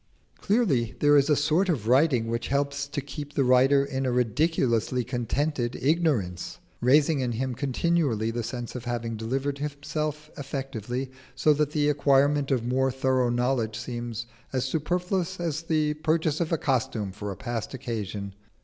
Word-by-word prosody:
Clearly 170 - +1
there 145 0 +5
is 140 +1 +4
a 150 - +5
sort 155 +7 +2
of 125 -11 -1
writing 130 -2 +4
which 115 +1 -2
helps 140 0 -1
to 145 0 -3
keep 145 +1 -8
the 140 - +2
writer 130 +2 +5
in 135 -1 -2
a - - +1
ridiculously 125 -1 +1
contented 125 +2 -1
ignorance; 135 - 0 0.2
raising 145 +4 +4
in 125 -2 -1
him 130 +2 -2
continually 135 -4 0
the 120 +1 -2
sense 120 +1 -5
of 125 -2 -7
having 120 -1 -3
delivered 135 +6 -2
himself 150 +1 -4
effectively, 130 -2 -4 0.2
so 150 +4 +4
that 150 0 +1
the 150 -1 +1
acquirement 145 0 +3
of 125 -4 +1
more 130 +2 +2
thorough 130 -1 +1
knowledge 120 -2 0
seems 120 -1 -5 0.3
as 130 -1 0
superfluous 180 +5 -1
as 165 -3 -2
the 155 -2 +1
purchase 155 0 0
of 165 - 0
costume 115 -6 -1
for 105 +1 -6
a 95 - -7
past 120 +2 -4
occasion. 105 -6 -4
135 Hz, 160 wpm, -26 LUFS, 120-150 Hz, 0.3 s, there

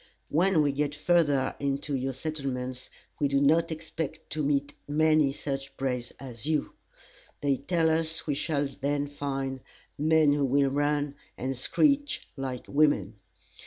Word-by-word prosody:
When 170 0 +3
we 145 - +2
get 145 +1 -1
further 145 -5 +2
into 140 +1 -1
your 135 +1 -1
settlements, 130 -3 -4 0.3
we 145 - +3
do 140 0 +2
not 165 +4 +3
expect 160 0 -5
to 155 - -1
meet 145 0 0
many 155 -1 +3
such 135 -1 -5
braves 125 -3 -2
as 125 -1 -7
you. 155 -2 0 0.7
They 140 -2 +2
tell 165 +3 +1
us 160 0 0
we 150 - 0
shall 145 0 0
then 140 +1 -1
find 135 -2 -3 0.4
men 155 -1 +4
who 145 -1 +1
will 135 +1 +3
run, 145 0 +1 0.2
and 130 +2 -2
screech 285 - +1
like 130 -2 -4
women. 145 -8 +2
145 Hz, 145 wpm, -28 LUFS, 135-155 Hz, 0.7 s, men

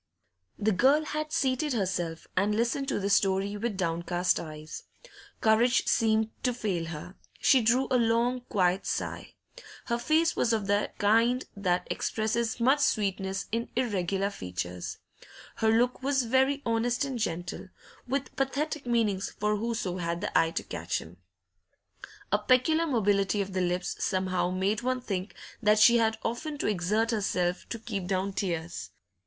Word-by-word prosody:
The 215 +1 +1
girl 270 +10 +4
had 305 0 -3
seated 285 -2 0
herself, 175 -6 -2
and 205 +3 +2
listened 240 +5 0
to - - 0
this 200 0 +1
story 195 +1 +2
with 210 -1 -3
downcast 175 0 0
eyes. 155 -1 -8 0.6
Courage 235 +3 +4
seemed 220 -1 +2
to 250 -2 0
fail 190 -8 -2
her; 165 +2 -7 0.3
she 265 - +5
drew 240 +4 +3
a 255 - +4
long, 235 +2 +2
quiet 185 -1 +1
sigh. - - -4 0.5
Her 235 -1 -1
face 320 +6 +2
was 235 - +2
of 215 -3 0
the 205 +1 +1
kind 230 +5 +3
that 180 -3 0
expresses 225 +2 -1
much 265 +5 +4
sweetness 195 -6 0
in 230 +1 -2
irregular 200 -5 0
features. 90 - -5 0.6
Her 220 - +2
look 245 +3 +2
was 270 0 +1
very 265 +4 +2
honest 235 +3 +1
and 265 -3 -4
gentle, 175 -3 -3 0.4
with 270 +1 -2
pathetic 280 +1 -2
meanings 215 -5 +1
for 210 0 -1
whoso 220 -5 -2
had 170 -1 -2
the - - -4
eye 165 - +4
to - - -3
catch 85 +1 -3
them; 85 +2 -9 1.1
a 205 - +3
peculiar 255 +9 +3
mobility 205 - +2
of 195 -1 -2
the 185 - 0
lips 180 0 -2
somehow 185 -1 0
made 190 +4 0
one 255 +1 0
think 195 -5 -4 0.3
that 215 -1 +4
she 235 +3 +7
had 220 -1 +2
often 290 +6 -3
to - - -3
exert 210 +4 +1
herself 180 -4 -1
to 230 - -3
keep 205 -5 -5
down 190 +1 -1
tears. 165 - -3
215 Hz, 155 wpm, -28 LUFS, 185-245 Hz, 1.1 s, she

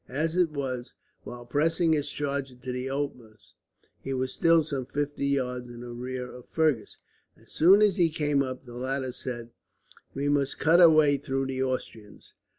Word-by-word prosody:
As 155 +5 -1
it 180 -2 +3
was, 130 -4 -5 0.3
while 120 0 -8
pressing 160 +6 +2
his 145 -2 0
charger 140 -2 -3
to 125 +1 -7
the 125 +1 -4
utmost, 125 -6 -6 0.5
he 135 - -3
was 130 0 -2
still 165 -1 +4
some 140 -4 -4
fifty 145 0 -2
yards 125 -3 -1
in 120 0 -9 0.2
rear 125 0 -4
of 125 -1 -12
Fergus. 150 -10 0 0.4
As - - -19
soon 190 +6 +6
as 205 -4 +3
he 170 -2 +4
came 150 -2 0
up, 130 -1 -4
the 120 - -11
latter 130 +1 -3
said: 120 -2 -6 0.6
"We 140 +1 -1
must 145 -1 +1
cut 165 +4 +4
our 170 - +10
way 150 -3 +4
through 135 -1 -2
the 130 0 -3
Austrians. 125 -5 -5
135 Hz, 175 wpm, -27 LUFS, 125-150 Hz, 0.6 s, our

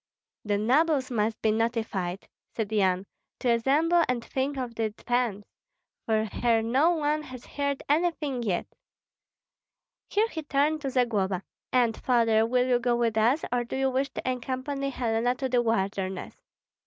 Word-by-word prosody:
"The 205 -1 0
nobles 265 +5 +2
must 220 -1 0
be 220 - +4
notified," 220 -5 -2 0.3
said 220 -2 -2
Yan, 190 -3 +2 0.3
"to 250 - 0
assemble 300 +9 +3
and 240 -2 -1
think 270 +1 -2
of 250 -3 -3
defence, 225 -1 -1 0.6
for 220 -1 +2
here 225 +1 +1
no 265 +8 +3
one 305 -2 +1
has 255 -4 -10
heard 280 -1 -2
anything 300 -4 0
yet." 195 -7 -1 1.4
Here 430 +2 +2
he 320 - -5
turned 300 +1 +1
to 275 - -2
Zagloba: 210 -8 0 0.3
"And, 240 -3 +3
Father, 225 -3 +2
will 250 +1 +2
you 245 -1 +3
go 240 0 +1
with 235 -2 +1
us, 235 +8 +2
or 245 0 +1
do 240 - -6
you 265 0 +1
wish 270 +2 0
to - - -4
accompany 260 +2 -2
Helena 240 -1 0
to 265 +1 -2
the 250 -1 +2
wilderness?" 195 -4 -2
245 Hz, 155 wpm, -27 LUFS, 220-275 Hz, 1.4 s, be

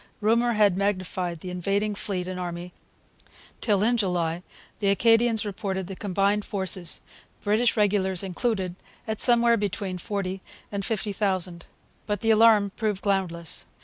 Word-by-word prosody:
Rumour 235 +3 +2
had 210 -4 +4
magnified 185 -3 -2
the 180 - -6
invading 200 +4 -1
fleet 190 -3 -2
and 185 0 -5
army 175 0 -5 0.9
till, 205 -3 +2
in 240 +2 +2
July, 175 -5 0 0.4
the 200 - 0
Acadians 225 +2 +3
reported 190 -2 -3
the 190 +1 -7
combined 200 +1 0
forces, 190 -4 0 0.4
British 225 +4 +2
regulars 195 -3 +2
included, 190 -1 -2 0.3
at 220 -1 -3
somewhere 235 -1 +6
between 200 -2 -3
forty 195 -1 -3 0.3
and 200 -1 -3
fifty 210 -1 -2
thousand. 185 -4 -1 0.4
But 205 -2 -2
the 225 - +3
alarm 215 -2 +5
proved 210 -3 -2
groundless. 180 -5 -2
200 Hz, 140 wpm, -26 LUFS, 185-215 Hz, 0.9 s, somewhere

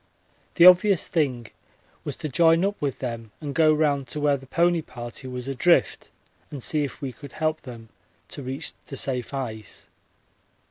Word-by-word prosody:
The 170 - +7
obvious 185 +1 +6
thing 135 -8 0 0.6
was - - -4
to - - -4
join 165 +5 +4
up 200 +1 -1
with 140 -3 -1
them 115 -3 -5
and 145 -3 -5
go 155 0 +4
round 145 -3 +1
to 150 - -5
where 145 -1 +3
the 135 -1 -10
pony 170 +4 +2
party 120 -1 -8
was 125 0 -6
adrift, 135 +6 +2 0.4
and 140 -4 -7
see 150 -2 +1
if 140 - -6
we 135 - -3
could 140 +4 -12
help 155 0 -1
them 115 -3 -11 0.4
to - - -7
reach 135 +4 -5
the 135 - -6
safe 125 -3 -2
ice. 115 -6 -6
140 Hz, 175 wpm, -25 LUFS, 125-160 Hz, 0.6 s, The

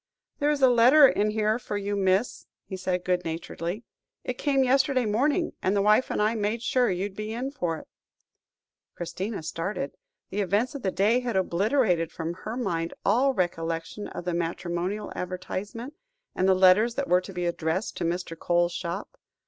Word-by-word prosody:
"There 290 - +2
is 290 -2 0
a - - +9
letter 250 +4 +7
in 210 -4 +1
here 215 +1 +1
for 210 - -4
you, 205 0 -2
miss," 195 +3 0 0.2
he 190 - -6
said 180 -1 -2
good 180 -1 +1
naturedly; 170 +5 -4 0.4
"it 250 - -4
came 275 -2 +2
yesterday 265 -1 +2
morning, 285 - +1
and 190 +2 +1
the 200 - +3
wife 215 +4 +4
and - - -2
I 210 +2 +2
made 220 +1 -1
sure 250 0 +2
you'd 190 +2 -2
be 215 +1 -4
in 255 +4 -3
for 175 - -2
it." - - -12 1.1
Christina 185 +3 -4
started. 165 0 -3 0.4
The 205 +2 -1
events 205 +6 +1
of 280 - -6
the 195 - 0
day 210 +6 +2
had 245 -3 -3
obliterated 190 - +1
from 165 +1 -4
her 215 +6 -6
mind 170 -9 -2
all 255 +6 +3
recollection 165 +1 -2
of 175 - -7
the 180 - -1
matrimonial 175 +4 -3
advertisement, 200 +8 -5 0.4
and 185 +1 +1
the 190 - +5
letters 190 +5 +5
that 280 -1 -2
were 180 0 +4
to 190 - -9
be 180 -1 -3
addressed 170 +3 -1
to - - -2
Mr. 170 0 -2
Coles's 175 +1 +1
shop. 185 - -5
200 Hz, 180 wpm, -27 LUFS, 175-235 Hz, 1.1 s, a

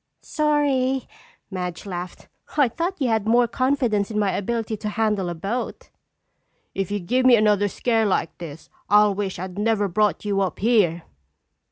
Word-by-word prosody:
"Sorry," 280 -4 +1 0.4
Madge 180 -1 -5
laughed. 180 -2 -7 0.3
"I 285 -3 +5
thought 340 +9 -3
you 265 -4 +1
had 220 -2 0
more 240 +1 +4
confidence 245 -5 0
in 215 - -4
my 205 -2 +2
ability 225 +2 -2
to 210 +1 -4
handle 210 -4 0
a 170 - -4
boat." 200 +9 -4 0.8
"If 195 -2 -2
you 205 0 -1
give 250 +9 0
me 255 -1 +7
another 210 -2 +3
scare 225 +1 +1
like 185 -3 -1
this, 160 -2 -9 0.2
I'll 210 0 +5
wish 195 -1 -3
I'd 185 +2 -6
never 210 -1 +1
brought 210 +3 0
you 200 -1 0
up 190 - -1
here." 195 -7 +2
210 Hz, 165 wpm, -23 LUFS, 195-240 Hz, 0.8 s, me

